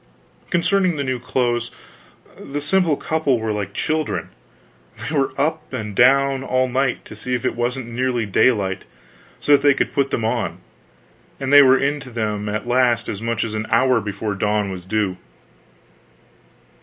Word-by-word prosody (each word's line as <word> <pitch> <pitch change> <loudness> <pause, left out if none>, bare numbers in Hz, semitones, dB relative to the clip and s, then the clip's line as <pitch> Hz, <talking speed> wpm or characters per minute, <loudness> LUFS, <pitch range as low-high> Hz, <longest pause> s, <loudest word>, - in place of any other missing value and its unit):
Concerning 185 0 +2
the 140 - -1
new 130 -2 -2
clothes, 120 -2 -1 0.7
the 145 +1 -6
simple 165 0 +2
couple 155 -5 0
were 110 -1 -2
like 100 -2 -3
children; 155 +8 -2 0.7
they 155 - -5
were 135 -2 +1
up 155 +2 -1
and 110 -5 -5
down, 135 +2 +4
all 130 -1 +1
night, 130 0 -1
to - - -10
see 125 +4 -3
if 120 - -4
it - - +1
wasn't 120 +2 -2
nearly 120 0 -1
daylight, 100 -2 +1 0.6
so - - -1
that 140 -1 +6
they 145 -1 +4
could - - -1
put 140 -1 +1
them 115 - -1
on, 110 - -1 0.8
and 135 +1 -2
they 145 - +10
were 135 -1 +6
into 140 0 -2
them 105 -3 -3
at 105 +3 -3
last 120 -2 +2
as 100 - -5
much 115 -1 -1
as 110 - -4
an 110 0 -3
hour 125 +1 +3
before 105 +1 -3
dawn 105 0 0
was 90 -1 -8
due. 100 -3 -1
125 Hz, 170 wpm, -21 LUFS, 110-140 Hz, 0.8 s, they